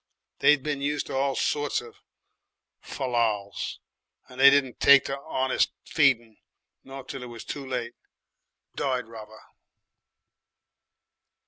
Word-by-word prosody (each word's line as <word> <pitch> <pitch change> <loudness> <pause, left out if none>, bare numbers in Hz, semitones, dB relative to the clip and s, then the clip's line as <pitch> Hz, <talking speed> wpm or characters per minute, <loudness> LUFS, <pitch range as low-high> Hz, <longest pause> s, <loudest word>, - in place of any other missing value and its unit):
They'd 150 -2 +4
been 145 -2 -3
used 145 +1 -1
to - - -6
all 135 0 0
sorts 145 -1 0
of 120 -1 -13 0.8
fallals, 115 -6 -2 0.5
and 130 +1 -7
they 140 - +10
didn't 140 -3 +1
take 140 -1 +7
to 135 - -3
'onest 130 -1 0
feeding, 120 -7 +2 0.5
not 135 -1 -10
till 135 -1 -7
it 125 - -7
was 120 -2 -10
too 140 - -6
late. 120 -2 -4 0.8
Died 130 -3 -1
rather. 110 -1 -12
130 Hz, 120 wpm, -26 LUFS, 120-140 Hz, 0.8 s, they